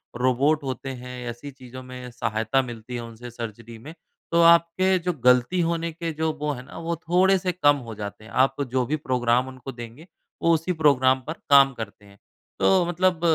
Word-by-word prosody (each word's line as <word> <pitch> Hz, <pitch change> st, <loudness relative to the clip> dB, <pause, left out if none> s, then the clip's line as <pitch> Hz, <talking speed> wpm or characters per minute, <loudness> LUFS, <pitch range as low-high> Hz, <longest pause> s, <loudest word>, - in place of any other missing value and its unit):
Robot 135 Hz, +5 st, +2 dB
होते 135 Hz, 0 st, -5 dB
हैं 125 Hz, 0 st, -8 dB, 0.2 s
ऐसी 130 Hz, +5 st, -8 dB
चीज़ों 130 Hz, -1 st, -11 dB
में 125 Hz, 0 st, -9 dB
सहायता 115 Hz, +2 st, 0 dB
मिलती 120 Hz, -1 st, -8 dB
है 120 Hz, -, -3 dB
उनसे 115 Hz, +1 st, -9 dB
सर्जरी 115 Hz, 0 st, -8 dB
में 155 Hz, +3 st, -9 dB, 0.4 s
तो 170 Hz, 0 st, +4 dB
आपके 170 Hz, +3 st, +4 dB
जो 180 Hz, -, +1 dB
ग़लती 125 Hz, +8 st, +4 dB
होने 170 Hz, 0 st, -2 dB
के 165 Hz, 0 st, -4 dB
जो 160 Hz, +1 st, -1 dB
वो 150 Hz, 0 st, -1 dB
हैं 125 Hz, -1 st, -8 dB
ना 140 Hz, -, -12 dB
वो 170 Hz, -, 0 dB
थोड़े-से 180 Hz, +3 st, +2 dB
कम 145 Hz, -5 st, +3 dB
हो 110 Hz, -2 st, -7 dB
जाते 105 Hz, +1 st, -7 dB
हैं। 110 Hz, -, -13 dB
आप 135 Hz, +2 st, +2 dB
जो 130 Hz, -1 st, +1 dB
भी 150 Hz, -, -1 dB
प्रोग्राम 125 Hz, 0 st, +1 dB
उनको 130 Hz, 0 st, -8 dB
देंगे 120 Hz, +7 st, -10 dB, 0.3 s
वो 170 Hz, -, +4 dB
उसी 165 Hz, +3 st, 0 dB
प्रोग्राम 130 Hz, -3 st, +4 dB
पर 160 Hz, -, -2 dB, 0.2 s
काम 135 Hz, -1 st, +7 dB
करते 105 Hz, -3 st, -8 dB
हैं। 100 Hz, 0 st, -18 dB, 0.4 s
तो 185 Hz, -2 st, +4 dB
मतलब 175 Hz, 0 st, +1 dB
130 Hz, 195 wpm, -24 LUFS, 120-165 Hz, 0.4 s, काम